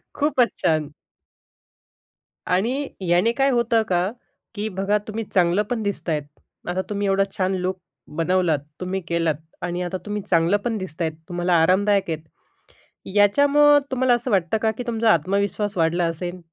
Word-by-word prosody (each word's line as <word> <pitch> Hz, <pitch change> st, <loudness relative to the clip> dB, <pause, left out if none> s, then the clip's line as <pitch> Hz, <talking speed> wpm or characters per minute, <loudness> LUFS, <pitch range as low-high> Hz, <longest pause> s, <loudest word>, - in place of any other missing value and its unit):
खूपच 275 Hz, -5 st, +2 dB
छान. 155 Hz, -2 st, +1 dB, 1.5 s
आणि 240 Hz, +10 st, 0 dB, 0.2 s
याने 180 Hz, +7 st, +4 dB
काय 270 Hz, +3 st, +2 dB
होतं 235 Hz, -2 st, +2 dB
का, 180 Hz, +1 st, +1 dB, 0.5 s
की 210 Hz, +1 st, -2 dB
बघा, 195 Hz, +1 st, 0 dB
तुम्ही 220 Hz, +1 st, -3 dB
चांगलं 180 Hz, +1 st, +3 dB
पण 240 Hz, -3 st, -2 dB
दिसत 200 Hz, -3 st, -3 dB
आहेत. 150 Hz, -2 st, 0 dB, 0.5 s
आता 185 Hz, +1 st, 0 dB
तुम्ही 205 Hz, -1 st, -1 dB
एवढा 195 Hz, 0 st, +3 dB
छान 190 Hz, 0 st, +1 dB
लूक 185 Hz, 0 st, -2 dB, 0.4 s
बनवलात, 170 Hz, -2 st, +2 dB, 0.2 s
तुम्ही 190 Hz, +1 st, -2 dB
केलात 165 Hz, -2 st, 0 dB, 0.3 s
आणि 175 Hz, +1 st, -3 dB
आता 180 Hz, +1 st, -3 dB
तुम्ही 210 Hz, 0 st, -3 dB
चांगलं 170 Hz, +3 st, +3 dB
पण 230 Hz, -2 st, 0 dB
दिसत 185 Hz, -4 st, -7 dB
आहात, 160 Hz, -1 st, 0 dB, 0.2 s
तुम्हाला 175 Hz, 0 st, 0 dB
आरामदायक 195 Hz, +2 st, +2 dB
आहेत, 160 Hz, -1 st, -3 dB, 0.9 s
याच्यामुळे 285 Hz, +8 st, +5 dB
तुम्हाला 260 Hz, -1 st, +2 dB
असं 240 Hz, 0 st, -1 dB
वाटतं 190 Hz, +2 st, +2 dB
का, 220 Hz, -, +2 dB
की 220 Hz, +3 st, -6 dB
तुमचा 225 Hz, -1 st, +2 dB
आत्मविश्वास 200 Hz, +4 st, -1 dB
वाढला 170 Hz, +1 st, +2 dB
असेल? 175 Hz, +2 st, -4 dB
195 Hz, 155 wpm, -23 LUFS, 175-220 Hz, 1.5 s, याच्यामुळे